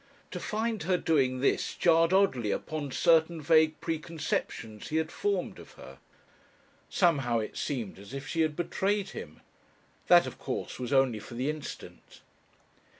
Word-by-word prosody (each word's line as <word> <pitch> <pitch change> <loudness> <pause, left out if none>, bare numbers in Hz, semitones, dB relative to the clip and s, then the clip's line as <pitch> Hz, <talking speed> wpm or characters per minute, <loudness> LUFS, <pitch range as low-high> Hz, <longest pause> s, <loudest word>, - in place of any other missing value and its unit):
To 180 - -5
find 220 +2 -2
her 180 +3 +1
doing 130 -7 +1
this 140 - +1
jarred 165 0 +4
oddly 190 - +2
upon 150 +6 -3
certain 165 +3 +3
vague 155 +1 +3
preconceptions 155 -9 -3
he 155 - -4
had 160 0 -1
formed 410 0 -2
of - - -13
her. - - -13 0.9
Somehow 140 -10 +2
it 110 -1 -4
seemed 115 -9 -4
as 100 0 -12
if 135 0 -6
she 165 +3 -1
had 155 -2 +1
betrayed 195 +4 -1
him. - - -9 0.7
That 175 -1 +7
of - - -8
course 130 - -4
was 125 -1 -4
only 135 -5 +3
for 120 - -10
the 130 +5 0
instant. 155 -1 -10
155 Hz, 150 wpm, -29 LUFS, 130-170 Hz, 0.9 s, That